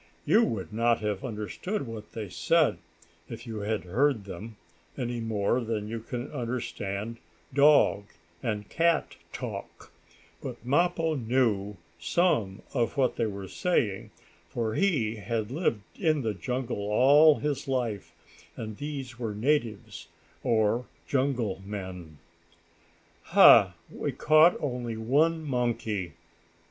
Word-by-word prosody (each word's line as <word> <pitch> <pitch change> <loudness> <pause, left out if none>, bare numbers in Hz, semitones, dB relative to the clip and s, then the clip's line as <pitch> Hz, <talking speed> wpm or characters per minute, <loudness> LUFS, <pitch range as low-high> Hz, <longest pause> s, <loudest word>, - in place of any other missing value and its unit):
You 225 - +5
would 110 - -3
not 115 +1 +2
have 105 -2 -2
understood 130 - -4
what 110 -3 -9
they 110 -2 -5
said, - - +2 0.5
if - - -8
you 110 -3 -5
had 105 -2 -2
heard 115 +4 +1
them, 105 +3 -8 0.4
any 120 -2 -3
more 110 +1 0
than 110 -2 -3
you 115 +1 -4
can 120 +3 -6
understand 115 -4 -4 0.4
dog 140 -7 +5 0.4
and 105 -3 -3
cat 165 -1 +1 0.2
talk, - - -7 0.5
but 120 -2 -7
Mappo 165 +4 +2
knew 110 -6 0 0.2
some 110 - +1
of 120 +2 0
what 130 -2 +2
they 115 - +1
were 100 -2 -6
saying, 105 - -1 0.4
for 115 -2 -2
he 125 - +1
had 110 +2 -3
lived 130 - -1
in 155 -6 +1
the 110 -2 -1
jungle 125 +5 -3
all 145 +7 +6
his 145 -2 -3
life, 120 -7 -2 0.4
and 110 -2 -6
these 135 -5 -6
were 110 -4 -3
natives, 115 -3 -1 0.4
or 115 +1 +1 0.2
jungle 125 -8 0
men. 95 -6 -7 1.2
"Ha! - - +8 0.2
We - - -3
caught 155 +3 +5
only 125 -5 -3
one 155 +8 +2
monkey!" 115 - -2
115 Hz, 125 wpm, -28 LUFS, 105-140 Hz, 1.2 s, Ha